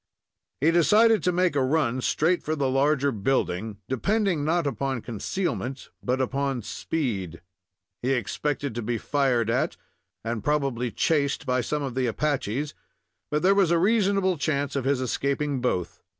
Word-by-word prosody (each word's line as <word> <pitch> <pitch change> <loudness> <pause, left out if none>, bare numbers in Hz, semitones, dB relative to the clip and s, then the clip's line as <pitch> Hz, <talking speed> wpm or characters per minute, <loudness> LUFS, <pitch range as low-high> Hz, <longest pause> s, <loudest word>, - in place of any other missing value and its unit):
He 160 +3 +4
decided 210 +7 +5
to 180 - +2
make 180 -3 +1
a 140 - +3
run 130 -2 +1
straight 170 +7 +1
for 155 - -2
the 140 -3 0
larger 140 +1 +2
building, 105 -3 -1
depending 190 - 0
not 165 +2 +1
upon 135 -3 -2
concealment 130 - -3
but 125 +1 0
upon 135 -1 -1
speed. 100 - -3 0.6
He 130 +2 +1
expected 140 +2 -2
to 120 - -3
be 120 +1 -1
fired 125 -3 +1
at, 125 - 0 0.5
and 115 -2 -3
probably 135 -5 0
chased 140 +4 0
by 125 0 +1
some 150 +5 -2
of 135 -3 -3
the 130 0 0
Apaches, 145 +1 -1 0.6
but 150 +2 -1
there 190 +2 +6
was 195 -4 +3
a 170 - +3
reasonable 195 -2 +2
chance 140 -1 -1
of 135 -2 -1
his 135 -1 +1
escaping 140 +2 -1
both. 90 -9 -2
140 Hz, 155 wpm, -26 LUFS, 125-155 Hz, 0.6 s, there